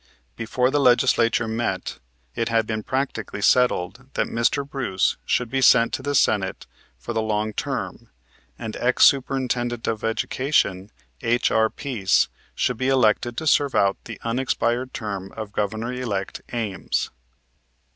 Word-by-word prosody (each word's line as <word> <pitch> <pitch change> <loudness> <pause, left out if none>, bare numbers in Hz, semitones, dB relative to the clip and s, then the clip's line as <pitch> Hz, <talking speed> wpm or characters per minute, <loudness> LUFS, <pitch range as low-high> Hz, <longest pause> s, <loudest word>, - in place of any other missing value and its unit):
Before 125 +3 0
the 145 - +2
legislature 120 -3 +3
met, 115 +2 -3 0.3
it 115 - -1
had 115 -1 +2
been 110 0 -3
practically 115 -5 -3
settled 125 0 +2
that - - +1
Mr. 115 +4 0
Bruce 115 -10 0
should 125 - +1
be 135 0 0
sent 120 -2 +5
to - - -2
the 145 +1 -2
Senate 100 -7 +1 0.3
for 120 - -6
the 110 - 0
long 110 0 -1
term - - -4 0.5
and 110 -1 -6
Ex 125 +1 +4
Superintendant 125 -3 +1
of 110 -1 -2
Education, 115 -4 0 0.3
H.R. 115 -1 +2
Pease, 110 -10 +1 0.3
should 125 - 0
be 130 - -1
elected 120 -2 +2
to 160 - -3
serve 145 -2 +3
out 100 0 +3
the 110 -3 -8
unexpired 125 +1 -1
term 100 -4 -5
of 110 -2 -6
Governor 110 +4 -2
elect 110 -7 -3
Ames. 110 -5 -2
115 Hz, 140 wpm, -23 LUFS, 110-130 Hz, 0.5 s, sent